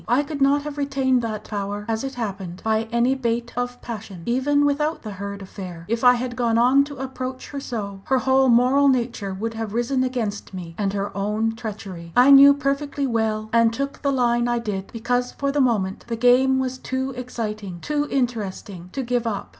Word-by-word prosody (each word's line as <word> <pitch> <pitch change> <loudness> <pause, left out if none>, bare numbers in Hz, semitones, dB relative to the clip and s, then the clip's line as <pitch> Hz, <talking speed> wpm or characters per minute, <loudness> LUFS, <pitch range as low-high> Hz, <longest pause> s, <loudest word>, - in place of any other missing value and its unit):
I 245 +5 +3
could 290 -1 -6
not 280 +1 +4
have 295 -1 -6
retained 270 -3 +1
that 215 -2 -4
power, 205 0 -4
as 225 +1 -1
it 270 -1 -4
happened, 195 -6 -5
by 220 0 +1
any 235 +2 +3
bait 240 -2 -2
of 245 0 -3
passion. 210 -6 -7
Even 285 +4 +2
without 300 +2 0
the 215 - -6
Hurd 200 0 -6
affair, 180 -3 -8
if 230 +2 -1
I 250 0 +7
had 245 0 -3
gone 235 -2 +1
on 255 +4 +5
to 285 -1 -9
approach 260 0 -5
her 285 - -4
so, 200 -7 -5
her 265 - +2
whole 265 0 +3
moral 255 +4 +5
nature 235 -6 0
would 220 +4 -4
have 225 -1 -5
risen 255 +2 +1
against 225 -6 -3
me 170 -2 -7
and 200 0 -1
her 200 0 -3
own 210 +3 0
treachery. 200 -7 -7
I 250 +3 +7
knew 280 +1 +10
that 285 - -10
perfectly 280 0 -1
well, 220 -3 -1
and 230 -1 +5
took 275 +4 -4
the 280 - +1
line 240 -2 +2
I 240 0 +1
did 205 -5 -4
because 245 +2 -1
for 280 0 -1
the 290 0 +1
moment 205 -7 0
the 235 - -2
game 250 +3 +4
was 260 0 -2
too 260 +1 -3
exciting, 215 -7 -5
too 295 +6 -1
interesting, 205 -8 -3
to 270 - -2
give 245 -1 -1
up. 205 -3 -3
240 Hz, 205 wpm, -23 LUFS, 210-265 Hz, -, knew